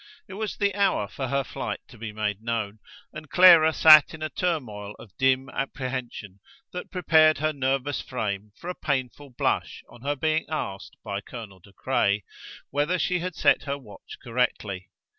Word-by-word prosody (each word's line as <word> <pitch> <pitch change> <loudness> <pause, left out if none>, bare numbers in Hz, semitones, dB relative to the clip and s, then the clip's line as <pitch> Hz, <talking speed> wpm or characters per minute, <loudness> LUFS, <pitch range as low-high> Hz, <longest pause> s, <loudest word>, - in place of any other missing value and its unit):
It 190 - -10
was 215 +1 -4
the 200 -1 +1
hour 195 - +1
for 130 +4 -5
her 140 +2 0
flight - - -5
to - - -14
be 110 -1 -5
made 105 -1 -3
known, 110 -2 -3 0.3
and 155 -1 -9
Clara 170 -1 +8
sat 155 0 +7
in 155 - -8
a 155 - -2
turmoil 110 - -3
of 100 -5 -15
dim 130 0 +2
apprehension 130 -7 -5 0.3
that 180 - -6
prepared 160 -4 +4
her 155 +1 0
nervous 135 0 -1
frame 105 -4 -4
for 170 - -10
a 180 - -2
painful 140 -3 -3
blush 125 - -2
on 120 - -15
her 145 +2 -1
being 155 +3 0
asked 100 -11 -5
by 100 -2 -4
Colonel 105 -3 -10
De 100 +3 -19
Craye 100 +2 0 0.5
whether 150 +6 +1
she 180 0 0
had 180 -1 -4
set - - +3
her 140 -1 -2
watch 110 -7 -13
correctly. 110 -6 -2
135 Hz, 175 wpm, -26 LUFS, 105-155 Hz, 0.5 s, Clara